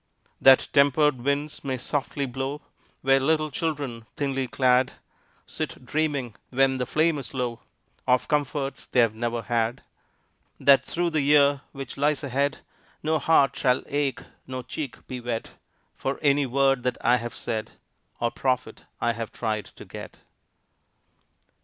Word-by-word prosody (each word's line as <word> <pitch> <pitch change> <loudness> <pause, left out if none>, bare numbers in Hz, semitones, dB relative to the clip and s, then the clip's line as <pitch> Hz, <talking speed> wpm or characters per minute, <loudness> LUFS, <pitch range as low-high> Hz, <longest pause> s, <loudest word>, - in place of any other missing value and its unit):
That 135 -1 +7
tempered 140 -1 +4
winds 145 +2 -1
may 135 -2 -2
softly 140 +2 -2
blow 135 +3 -4 0.4
Where 135 0 +5
little 155 +2 +1
children, 140 -7 -3
thinly 135 -3 -1
clad, 130 0 +3 0.5
Sit - - -5
dreaming, 140 -4 -1 0.2
when 130 0 +2
the 125 - -1
flame 155 +1 +2
is 135 - -8
low, 120 -2 -2 0.5
Of 125 -1 +3
comforts 145 -2 -1
they - - +1
have 115 -3 +4
never 120 +1 -2
had. 115 0 -1 0.8
That 140 -1 +6
through 175 0 -1
the 155 -2 +1
year 140 -1 +4
which 135 -2 -7
lies 145 0 +1
ahead 140 +1 0 0.4
No 155 0 +1
heart 140 -3 +4
shall 125 -1 +2
ache, 145 -1 -1 0.2
no 130 -1 -5
cheek 130 +1 -6
be 130 - -5
wet, 120 -2 -4 0.4
For 135 +1 -2
any 140 -1 +3
word 135 0 +2
that 125 0 -1
I 120 +2 +4
have 120 0 -6
said 110 -2 -4 0.5
Or 120 0 0
profit 125 -4 -2
I 120 - +1
have 115 -1 -5
tried 110 -2 -2
to - - -13
get. - - -9
135 Hz, 145 wpm, -26 LUFS, 125-145 Hz, 0.8 s, That